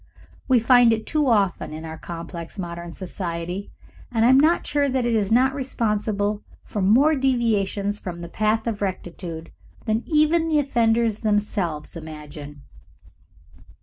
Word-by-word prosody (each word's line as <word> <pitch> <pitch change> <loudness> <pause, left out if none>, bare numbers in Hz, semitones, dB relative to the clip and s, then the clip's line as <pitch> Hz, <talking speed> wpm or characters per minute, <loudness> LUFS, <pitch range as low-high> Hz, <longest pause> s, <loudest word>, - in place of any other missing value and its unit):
We 260 -2 +5
find 240 0 +5
it 220 0 -3
too 300 -2 +1
often 200 -9 +1
in 160 +1 -7
our 160 0 -6
complex 170 +1 -8
modern 170 -2 -6
society, 175 +1 -5 0.4
and 225 -1 +2
I - - +5
am 260 +1 +7
not 320 +4 +3
sure 285 -1 +1
that 255 -2 0
it 240 - +1
is 205 -2 0
not 260 +3 +4
responsible 210 -5 -1 0.2
for 210 - -4
more 250 +11 +5
deviations 215 -7 0
from 175 -2 -7
the 170 - -6
path 215 +4 0
of 225 -3 -3
rectitude 175 -3 -5 0.3
than 220 0 0
even 320 +1 +3
the 315 -2 +2
offenders 230 -5 +2
themselves 205 -8 -1
imagine. 150 -2 -9
210 Hz, 150 wpm, -23 LUFS, 175-245 Hz, 0.4 s, am